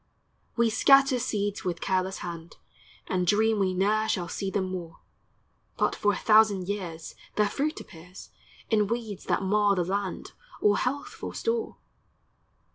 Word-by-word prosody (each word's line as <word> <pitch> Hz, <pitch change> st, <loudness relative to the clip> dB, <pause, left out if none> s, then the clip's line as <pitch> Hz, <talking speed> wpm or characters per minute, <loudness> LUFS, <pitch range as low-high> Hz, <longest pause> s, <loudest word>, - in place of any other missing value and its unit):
We 235 Hz, -1 st, +2 dB
scatter 270 Hz, +3 st, +5 dB
seeds 205 Hz, -4 st, -2 dB
with 175 Hz, -2 st, -2 dB
careless 190 Hz, 0 st, -1 dB
hand, 170 Hz, -1 st, -8 dB, 0.5 s
And 180 Hz, -1 st, -1 dB
dream 220 Hz, +2 st, +3 dB
we 185 Hz, -2 st, +1 dB
ne'er 215 Hz, +3 st, +1 dB
shall 175 Hz, -2 st, -1 dB
see 195 Hz, +3 st, -3 dB
them 190 Hz, -1 st, -2 dB
more; 175 Hz, -3 st, -6 dB, 0.8 s
But -, -, +1 dB
for 205 Hz, -, +2 dB
a -, -, -3 dB
thousand 210 Hz, -4 st, +4 dB
years 175 Hz, -5 st, -5 dB, 0.2 s
Their 210 Hz, -1 st, +3 dB
fruit 295 Hz, +9 st, -2 dB
appears, 180 Hz, +2 st, -13 dB, 0.4 s
In 210 Hz, -2 st, +3 dB
weeds 225 Hz, -3 st, -4 dB
that -, -, 0 dB
mar 205 Hz, +1 st, +3 dB
the 180 Hz, -, +1 dB
land, 195 Hz, +2 st, -3 dB, 0.3 s
Or 205 Hz, -1 st, +3 dB
healthful 275 Hz, +3 st, -4 dB
store. 460 Hz, -1 st, -2 dB
205 Hz, 145 wpm, -27 LUFS, 185-220 Hz, 0.8 s, scatter